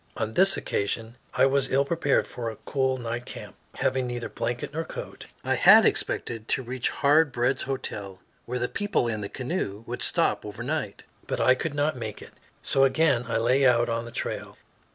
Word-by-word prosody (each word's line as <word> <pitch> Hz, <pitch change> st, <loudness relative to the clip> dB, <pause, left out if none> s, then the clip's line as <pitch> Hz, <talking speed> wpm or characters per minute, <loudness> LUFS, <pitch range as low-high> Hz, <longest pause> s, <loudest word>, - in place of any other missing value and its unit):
On 110 Hz, -1 st, -2 dB
this 195 Hz, +6 st, +4 dB
occasion 110 Hz, +3 st, -2 dB, 0.2 s
I -, -, +5 dB
was 135 Hz, -1 st, +2 dB
ill 140 Hz, +1 st, +3 dB
prepared 150 Hz, -2 st, +1 dB
for 115 Hz, -2 st, -4 dB
a 110 Hz, -, -7 dB
cool 130 Hz, -2 st, 0 dB
night 120 Hz, 0 st, -4 dB
camp, -, -, -8 dB, 0.2 s
having 130 Hz, -1 st, 0 dB
neither 120 Hz, -1 st, -4 dB
blanket 120 Hz, +4 st, -3 dB
nor 165 Hz, +2 st, -2 dB
coat. -, -, -8 dB, 0.2 s
I -, -, +1 dB
had -, -, +7 dB
expected 115 Hz, -1 st, -1 dB
to 130 Hz, -, 0 dB
reach 125 Hz, +1 st, -2 dB
Hard 150 Hz, +1 st, +3 dB
Bread's 125 Hz, +2 st, 0 dB
Hotel, 105 Hz, -8 st, -5 dB, 0.3 s
where 125 Hz, +1 st, -2 dB
the 125 Hz, 0 st, 0 dB
people 205 Hz, -10 st, 0 dB
in 110 Hz, -2 st, -2 dB
the 100 Hz, -, -4 dB
canoe 125 Hz, -, -3 dB
would -, -, -5 dB
stop -, -, +1 dB
overnight. -, -, -4 dB, 0.2 s
But -, -, -2 dB
I 130 Hz, -, +5 dB
could 145 Hz, +3 st, -3 dB
not 145 Hz, +1 st, +1 dB
make 110 Hz, -3 st, -5 dB
it, -, -, -13 dB, 0.3 s
so 135 Hz, -, +2 dB
again 135 Hz, -2 st, +3 dB
I 115 Hz, -, 0 dB
lay 125 Hz, +4 st, +3 dB
out 120 Hz, -2 st, +4 dB
on 115 Hz, 0 st, -1 dB
the 120 Hz, -, -9 dB
trail. -, -, -4 dB
125 Hz, 195 wpm, -26 LUFS, 115-140 Hz, 0.3 s, had